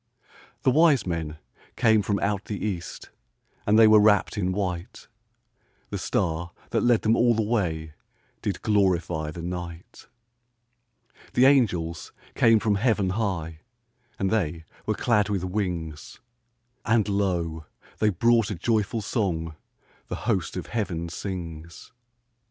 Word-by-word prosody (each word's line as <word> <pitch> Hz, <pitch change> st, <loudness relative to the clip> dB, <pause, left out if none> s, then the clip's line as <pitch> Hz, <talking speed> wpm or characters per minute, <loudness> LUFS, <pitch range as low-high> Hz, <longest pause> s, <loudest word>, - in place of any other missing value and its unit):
The 130 Hz, -, +4 dB
wise 155 Hz, -1 st, +4 dB
men 80 Hz, -3 st, -3 dB, 0.4 s
came 110 Hz, -3 st, +4 dB
from 100 Hz, 0 st, 0 dB
out 100 Hz, 0 st, -1 dB
the 105 Hz, -, -4 dB
east, 90 Hz, -5 st, -5 dB, 0.6 s
And 105 Hz, +1 st, +5 dB
they 115 Hz, -, +8 dB
were 110 Hz, 0 st, +7 dB
wrapped 105 Hz, -1 st, +3 dB
in 95 Hz, -3 st, 0 dB
white; 90 Hz, -3 st, -4 dB, 0.8 s
The -, -, -3 dB
star 85 Hz, +1 st, -1 dB, 0.2 s
that -, -, +1 dB
led 120 Hz, -2 st, +3 dB
them 110 Hz, +1 st, +3 dB
all 120 Hz, -1 st, +3 dB
the 110 Hz, -, +1 dB
way 85 Hz, -9 st, -1 dB, 0.5 s
Did 95 Hz, -3 st, -3 dB
glorify 90 Hz, -7 st, +1 dB
the 85 Hz, +2 st, -7 dB
night. 90 Hz, -1 st, -7 dB, 1.3 s
The 125 Hz, -, +5 dB
angels 90 Hz, -, +2 dB, 0.2 s
came 115 Hz, -1 st, +5 dB
from 105 Hz, -2 st, +1 dB
heaven 105 Hz, -6 st, +2 dB
high, 90 Hz, -7 st, -2 dB, 0.6 s
And 95 Hz, -1 st, -1 dB
they 85 Hz, -7 st, -1 dB, 0.2 s
were -, -, +1 dB
clad 105 Hz, -4 st, +2 dB
with 100 Hz, -3 st, -1 dB
wings; 90 Hz, -5 st, -4 dB, 0.6 s
And 115 Hz, -2 st, +2 dB
lo, 85 Hz, -6 st, -1 dB, 0.3 s
they 110 Hz, -, +3 dB
brought 115 Hz, +3 st, +3 dB
a 105 Hz, -, -3 dB
joyful 110 Hz, +3 st, 0 dB
song 85 Hz, -8 st, -2 dB, 0.5 s
The -, -, -4 dB
host 95 Hz, -7 st, -1 dB
of 90 Hz, -, -4 dB
heaven 90 Hz, -7 st, -3 dB
sings. 85 Hz, -2 st, -7 dB
95 Hz, 135 wpm, -25 LUFS, 85-110 Hz, 1.3 s, they